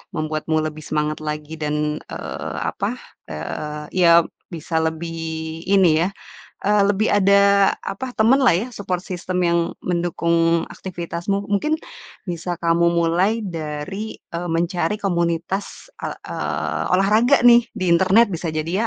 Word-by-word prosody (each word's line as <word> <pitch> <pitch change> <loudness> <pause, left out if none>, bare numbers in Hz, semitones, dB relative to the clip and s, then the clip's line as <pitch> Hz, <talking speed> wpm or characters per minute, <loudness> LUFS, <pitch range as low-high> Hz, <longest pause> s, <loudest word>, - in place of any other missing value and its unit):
membuatmu 155 0 -1
lebih 155 0 -5
semangat 150 0 -1
lagi 150 +1 -5
dan, 150 0 -1 0.3
eee, - - -6 0.2
apa, - - -3 0.3
eee, 150 - -5
ya 170 -2 +6 0.3
bisa 165 0 -5
lebih 160 +1 -3 0.5
ini 180 -5 +4
ya, - - +1 0.6
eee, 205 0 +4
lebih 205 +2 +1
ada 200 0 +4
apa, 255 +6 -5
temanlah 245 0 +4
ya, 195 +7 0
support 185 -6 -3
system 180 -1 -3
yang 170 0 +3 0.2
mendukung 170 -1 +1
aktivitasmu, 185 +2 -4
mungkin 300 +10 +1 0.6
bisa 175 +1 -3
kamu 170 0 +3
mulai 175 +7 +2
dari, 170 +3 -5 0.2
eee, 170 +1 -4
mencari 170 +2 0
komunitas 175 - -2
e - - -4
eee, - - -3
olahraga 215 +9 +4
nih 240 -1 +7
di 185 -5 -1
internet, 190 +6 +5
bisa 165 -2 -3
jadi 170 +8 -1
175 Hz, 125 wpm, -21 LUFS, 165-200 Hz, 0.6 s, nih